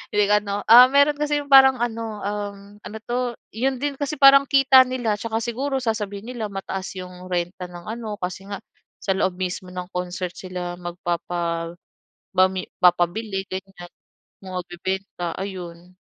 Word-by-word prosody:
Hindi 210 0 +4
ano, 205 -1 +1
ah, 245 +3 +10
meron 285 +1 +4
kasi 295 0 +1
'yong 285 - -18
parang 265 -1 +8
ano, 225 -3 -3
um, 205 0 -3 0.2
ano 215 +1 -8
'to, 245 0 -2 0.2
'yon 260 +3 0
din 290 -1 -1
kasi 285 +1 -2
parang 275 0 +8
kita 270 -1 +6
nila. 245 -4 -1
Tsaka 225 +1 -2
siguro 265 +4 -2
sasabihin 215 -1 -3
nila, 225 -3 -3
mataas 195 -1 -5
'yong 180 0 -9
renta 180 +1 -2
ng 175 -1 -10
ano, 225 -1 -5
kasi 185 +2 -5
nga 200 0 -5 0.4
sa 195 - 0
loob 190 -1 0
mismo 185 0 -4
ng 180 0 -6
concert 180 0 -3
sila 180 -1 -6
magpapabami 175 +2 -3
papabili, 185 +3 +2
ganyan. 185 -2 -8 0.5
Magbebenta, 180 -1 -4
ayon. 180 -2 -7
195 Hz, 145 wpm, -23 LUFS, 180-235 Hz, 0.5 s, ah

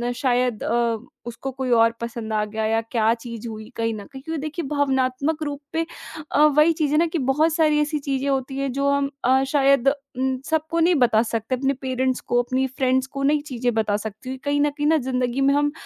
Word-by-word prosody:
शायद 250 -3 0
अ, 235 -1 +1 0.3
उसको 240 +3 -5
कोई 260 0 -4
और 230 -1 +5
पसंद 230 -1 -5
आ 210 0 +1
गया 220 +1 -3
या 225 +1 +1
क्या 225 -2 +3
चीज़ 235 -1 -7
हुई 215 0 -8
कहीं 225 0 -1
न 205 -2 -8
कहीं 270 -2 -11
क्योंकि 320 -1 -4
देखिए 310 +1 -4
भावनात्मक 280 +2 0
रूप 290 -1 -4
पे 330 0 0 0.5
अ, 300 - +5
वही 305 +2 +5
चीज़ 305 -3 -1
है 300 - +3
ना 335 +2 +3
कि 335 - -3
बहुत 310 +3 +2
सारी 305 -2 +3
ऐसी 300 0 -1
चीज़ें 275 -1 -2
होती 270 0 -1
हैं 275 -1 -1
जो 280 +1 +1
हम 280 0 +1 0.2
अ, 265 +2 +4
शायद 275 -2 +4 0.3
उम, 260 0 0
सबको 320 +1 0
नहीं 340 +2 +4
बता 225 -1 +3
सकते 230 +2 -2
अपने 270 +2 0
पेरेंट्स 260 -1 -1
को 245 0 +1
अपनी 260 +2 0
फ्रेंड्स 260 0 0
को 275 0 -5
नहीं 295 +1 +3
चीज़ें 245 -1 -1
बता 215 -2 +1
सकती 220 +5 -6
कहीं 285 +2 0
न 295 - +3
कहीं 295 +1 -2
ना 320 - +4
ज़िंदगी 250 +1 0
में 275 +1 +4
हम 290 0 +2
265 Hz, 220 wpm, -23 LUFS, 240-290 Hz, 0.5 s, और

